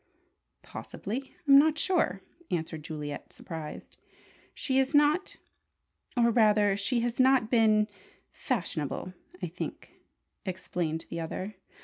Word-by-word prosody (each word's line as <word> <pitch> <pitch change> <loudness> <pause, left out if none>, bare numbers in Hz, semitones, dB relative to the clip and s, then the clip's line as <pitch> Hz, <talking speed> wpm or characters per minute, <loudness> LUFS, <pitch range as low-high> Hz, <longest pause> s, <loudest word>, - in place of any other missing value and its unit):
"Possibly. 255 +7 -6
I'm 275 0 +9
not 310 +1 +4
sure," 310 - +1 0.3
answered 160 -2 -2
Juliet, 150 -2 -6
surprised. 160 -3 -8 0.6
"She 265 -1 +1
is 265 +2 +1
not 295 +6 +3 0.8
or 235 -1 +5
rather 210 -3 +4
she 230 +4 +1
has 240 +1 -2
not 260 -3 +4
been 215 -3 +4 0.4
fashionable, 180 - -3 0.3
I - - 0
think," - - -6 0.5
explained 175 -4 -3
the 170 - -3
other. 185 +5 -4
215 Hz, 110 wpm, -29 LUFS, 175-260 Hz, 0.8 s, I'm